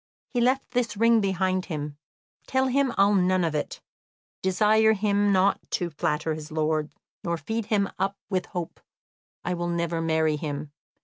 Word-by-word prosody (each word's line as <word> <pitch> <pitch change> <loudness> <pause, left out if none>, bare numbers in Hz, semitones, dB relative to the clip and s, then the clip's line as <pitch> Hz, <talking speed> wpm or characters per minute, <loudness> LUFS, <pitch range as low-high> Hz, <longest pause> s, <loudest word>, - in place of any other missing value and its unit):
"He 245 - 0
left 260 +2 +1
this 240 -4 -1
ring 230 +1 +5
behind 185 -1 0
him. 150 -4 -5 0.5
Tell 260 0 +2
him 275 0 +2
I'll 200 +1 +5
none 185 -1 +3
of 165 -2 0
it. 150 - -3 0.6
Desire 215 +4 +4
him 205 -1 +2
not 195 +1 +3
to 175 -2 -1
flatter 150 +1 -1
his 155 +1 -8
lord, 155 -1 0 0.3
nor 170 -1 -1
feed 215 +8 -3
him 200 -3 +2
up 195 +1 0
with 185 -2 -1
hope. 175 -2 -5 0.7
I 180 - 0
will 175 0 -2
never 170 -1 -1
marry 160 -1 +1
him. 145 -1 -5
185 Hz, 165 wpm, -26 LUFS, 160-210 Hz, 0.7 s, ring